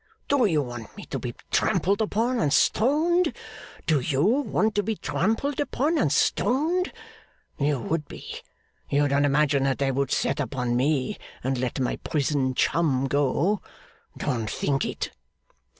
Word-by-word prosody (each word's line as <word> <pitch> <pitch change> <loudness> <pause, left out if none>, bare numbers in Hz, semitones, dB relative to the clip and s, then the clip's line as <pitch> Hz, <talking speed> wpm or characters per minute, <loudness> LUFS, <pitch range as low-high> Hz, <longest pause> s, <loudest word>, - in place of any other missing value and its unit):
Do 280 -4 +3
you 155 -6 +2
want 120 -3 -8
me - - -8
to - - -4
be - - -5 0.2
trampled 200 +3 +2
upon 230 +4 0
and 150 -3 +1
stoned? 310 - +3 0.5
Do 155 -3 +3
you 135 +2 0
want 220 -2 +2
to 205 - +2
be 220 +2 -2
trampled 225 +10 -1
upon 295 +2 0
and - - +2
stoned? 330 +9 +1 0.7
You 145 0 +2
would 150 +3 -2
be. - - -8 0.5
You 145 +1 +3
don't 140 +1 +2
imagine 145 0 +3
that 135 -1 +1
they 140 -1 +1
would 135 0 0
set - - 0
upon 125 -3 -1
me, 135 +1 0 0.2
and 130 0 -1
let 125 +1 -2
my 125 - -1
prison 140 -3 0
chum 140 -5 +2
go? 145 +8 +1 0.6
Don't 115 -6 -2
think 135 +4 0
it! - - -4
150 Hz, 150 wpm, -25 LUFS, 135-220 Hz, 0.7 s, Do